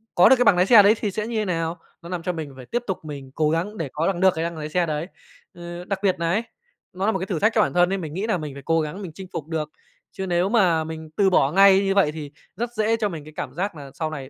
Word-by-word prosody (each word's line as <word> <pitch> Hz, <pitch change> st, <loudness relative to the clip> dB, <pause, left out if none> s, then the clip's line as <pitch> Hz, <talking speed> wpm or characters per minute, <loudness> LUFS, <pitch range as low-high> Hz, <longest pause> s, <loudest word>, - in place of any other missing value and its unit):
có 175 Hz, -, +7 dB
được 265 Hz, -, +8 dB
cái 245 Hz, -, +2 dB
bằng 190 Hz, -, +6 dB
nái 180 Hz, -, +3 dB
xe 210 Hz, 0 st, +8 dB
đấy 210 Hz, +3 st, +5 dB
thì 205 Hz, -, -2 dB
sẽ 215 Hz, +3 st, -3 dB
như 235 Hz, -, -4 dB
thế 215 Hz, -, -1 dB
nào, 165 Hz, -1 st, -2 dB, 0.2 s
nó 170 Hz, -, -10 dB
làm 180 Hz, -2 st, -4 dB
cho 180 Hz, -, -1 dB
mình 155 Hz, -4 st, -6 dB
phải 130 Hz, -, -11 dB
tiếp 240 Hz, -, -2 dB
tục 185 Hz, -5 st, -4 dB
mình 140 Hz, -3 st, -8 dB
cố 155 Hz, -1 st, +2 dB
gắng 180 Hz, +7 st, -2 dB
để 155 Hz, -5 st, -3 dB
có 160 Hz, +2 st, 0 dB
bằng 190 Hz, -3 st, -1 dB
được 190 Hz, -1 st, +5 dB
cái 160 Hz, -, -2 dB
bằng 170 Hz, -1 st, -4 dB
lái 155 Hz, 0 st, -5 dB
xe 175 Hz, +2 st, +1 dB
đấy. 155 Hz, +1 st, -3 dB, 0.5 s
Ờ, 175 Hz, +1 st, -8 dB
đặc 195 Hz, -1 st, -3 dB
biệt 190 Hz, -2 st, +3 dB
nà 165 Hz, -, 0 dB
ấy, 215 Hz, +6 st, +1 dB, 0.5 s
nó 190 Hz, +2 st, -2 dB
nà 220 Hz, -, +3 dB
một -, -, -2 dB
cái 190 Hz, -, -3 dB
thử 180 Hz, -5 st, -3 dB
thách 215 Hz, -, +3 dB
cho 215 Hz, -, +5 dB
bản -, -, 0 dB
thân 175 Hz, 0 st, +4 dB
ấy, 195 Hz, -, 0 dB
mình 155 Hz, -4 st, -6 dB
nghĩ 195 Hz, +5 st, -2 dB
nà 215 Hz, -, +1 dB
mình 150 Hz, -4 st, -6 dB
phải 140 Hz, -, -10 dB
cố 165 Hz, 0 st, +2 dB
gắng 155 Hz, +6 st, -5 dB
mình 180 Hz, -5 st, -7 dB
chinh 190 Hz, 0 st, -9 dB
phục 155 Hz, -1 st, -5 dB
được. 155 Hz, -2 st, -3 dB, 0.4 s
Chứ 190 Hz, -, -5 dB
nếu 175 Hz, +2 st, +1 dB
mà 180 Hz, -8 st, +3 dB
mình 160 Hz, 0 st, -7 dB
từ 195 Hz, -2 st, +4 dB
bỏ 140 Hz, -6 st, +3 dB
ngay 195 Hz, +2 st, +6 dB
như 195 Hz, 0 st, 0 dB
vậy 190 Hz, -7 st, +4 dB
thì 150 Hz, -2 st, -8 dB, 0.2 s
rất 240 Hz, +1 st, -3 dB
dễ 220 Hz, 0 st, +1 dB
cho 215 Hz, -2 st, 0 dB
mình 160 Hz, -5 st, -7 dB
cái 155 Hz, +1 st, -13 dB
cảm 130 Hz, -, -5 dB
giác 185 Hz, +2 st, -3 dB
nà 140 Hz, -2 st, -9 dB
sau 160 Hz, -1 st, -3 dB
này 140 Hz, -4 st, -7 dB
175 Hz, 325 wpm, -23 LUFS, 155-195 Hz, 0.5 s, được